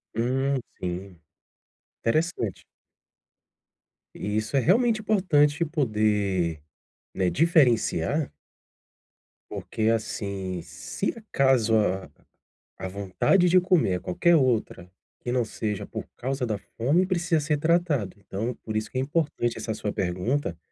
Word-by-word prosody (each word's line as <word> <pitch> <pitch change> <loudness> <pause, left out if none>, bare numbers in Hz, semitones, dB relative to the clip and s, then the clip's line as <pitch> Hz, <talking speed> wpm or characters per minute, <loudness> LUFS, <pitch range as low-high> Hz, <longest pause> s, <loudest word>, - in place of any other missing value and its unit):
Hum, 130 +4 +1 0.2
sim. 90 0 -5 0.8
Interessante. 115 - -1 1.5
E 105 +1 -2
isso 110 +4 -2
é - - +6
realmente 220 - +3
importante 170 -8 +3
poder, 105 - 0 0.5
né, 90 -2 +1
diferenciar 140 - +2 1.2
porque, 110 - -4
assim, 100 -5 -2
se - - -4
acaso 135 - +2
a 95 -3 0 0.7
a 95 - -4
vontade 100 - +2
de 185 +1 +6
comer 175 - +2
a - - -5
qualquer 170 - +2
outra 120 - 0 0.3
que 120 - -4
não 125 -1 +1
seja 105 -2 -3
por - - -7
causa 135 0 -2
da 110 -2 -1 0.2
fome, 145 +11 +3
precisa 175 -2 +1
ser 150 0 0
tratado. 160 - +1
Então, 110 +5 -4
por 110 - -5
isso 110 0 -2
que - - -9
é - - +2
importante 140 -5 -1
essa 110 - -3
sua 105 -1 -3
pergunta 95 - -1
120 Hz, 120 wpm, -26 LUFS, 100-155 Hz, 1.5 s, é